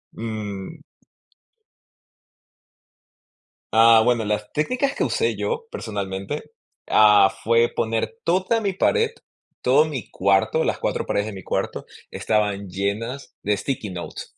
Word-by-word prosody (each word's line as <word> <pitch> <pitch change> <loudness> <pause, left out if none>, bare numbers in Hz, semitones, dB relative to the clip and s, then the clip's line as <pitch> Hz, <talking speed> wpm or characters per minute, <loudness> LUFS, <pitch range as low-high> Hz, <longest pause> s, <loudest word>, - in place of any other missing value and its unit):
Mm. 105 -4 -6 2.9
Ah, 115 0 +7
bueno, 120 -1 +2
las 105 0 -2
técnicas 255 - 0
que - - 0
usé 455 0 0
yo 470 -1 -3
personalmente 100 - -5 0.4
ah, 105 -2 +6
fue 115 +2 +3
poner 115 - -1
toda 185 +6 +1
mi 200 -2 0
pared, 455 - +2 0.5
todo 135 +4 +5
mi 140 -9 -5
cuarto, 100 +10 +2
las - - -1
4 - - -1
paredes 100 - 0
de 110 - -6
mi 95 -2 -9
cuarto - - -3 0.2
estaban 105 -2 -1
llenas 105 +8 -4
de 105 0 +1
sticky 115 -3 -3
notes, 90 -2 -8
110 Hz, 120 wpm, -23 LUFS, 100-150 Hz, 2.9 s, Ah